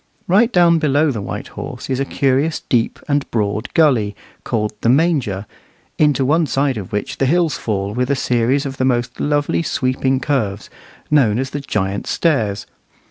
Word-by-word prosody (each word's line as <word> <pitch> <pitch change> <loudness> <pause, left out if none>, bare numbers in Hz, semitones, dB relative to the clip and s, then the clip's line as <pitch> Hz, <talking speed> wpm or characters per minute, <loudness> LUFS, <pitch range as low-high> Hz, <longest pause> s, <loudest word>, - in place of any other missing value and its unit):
Right 215 +7 +4
down 170 -4 +4
below 150 0 +2
the 110 -5 -4
White - - -6
Horse - - -7
is 130 -1 -1
a 135 - 0
curious 140 +3 0
deep 115 -2 +1
and 145 -1 0
broad 110 0 -1
gully 120 -11 +3 0.3
called 105 -3 -1
"the 115 - +2
Manger," 130 - +1 0.5
into 145 -3 +3
one 155 +3 +2
side 135 0 0
of 100 -4 -7
which 105 0 -3
the 135 - +2
hills 170 +1 +2
fall 100 -2 -3
with 125 +3 -1
a 140 - +2
series 125 +2 +1
of 135 -1 -5
the 130 - +1
most 120 -1 -1
lovely 145 +2 0
sweeping 130 -3 0
curves, 120 -8 -2 0.4
known 125 -8 +4
as 130 +1 -2
"the 145 - -3
Giant's 100 -6 -2
Stairs." 110 -12 0
130 Hz, 175 wpm, -18 LUFS, 110-145 Hz, 0.5 s, Right